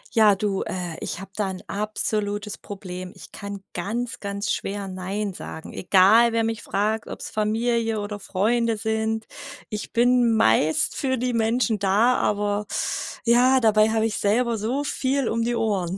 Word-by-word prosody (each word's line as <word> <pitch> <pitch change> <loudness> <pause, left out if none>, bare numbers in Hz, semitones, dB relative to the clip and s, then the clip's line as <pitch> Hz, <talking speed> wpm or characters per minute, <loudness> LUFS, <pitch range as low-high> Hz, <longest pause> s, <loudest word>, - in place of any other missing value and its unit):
Ja, 215 -2 +6
du, 195 -1 -1
äh, 175 -3 -4
ich - - -4
habe 195 0 -10
da 205 -3 -1
'n 185 -1 -7
absolutes 210 0 -2
Problem. 185 -2 -7
Ich - - -12
kann 200 -1 -7
ganz, 230 +7 -3
ganz 200 +1 -3
schwer 200 0 -3
nein 190 +2 -3
sagen. 160 -2 -8
Egal 205 +6 +5
wer 230 0 +2
mich 225 -1 -2
fragt, 210 +2 -1
ob's - - -7
Familie 225 +1 0
oder 205 0 -5
Freunde 225 +4 0
sind. 220 +1 -1 0.4
Ich 210 -2 -5
bin 240 -1 +3
meist 150 - +3
für 260 -2 0
die 250 +1 -1
Menschen 230 -1 +1
da, 200 +6 +3
aber 205 0 0 0.6
ja, 250 +3 +5
dabei 215 -2 +4
habe 220 0 +1
ich 225 - -1
selber 230 +3 +2
so 250 +7 -1
viel 275 -2 0
um 230 0 0
die 240 +1 0
Ohren. 195 -5 -1
215 Hz, 160 wpm, -24 LUFS, 200-230 Hz, 0.6 s, Ja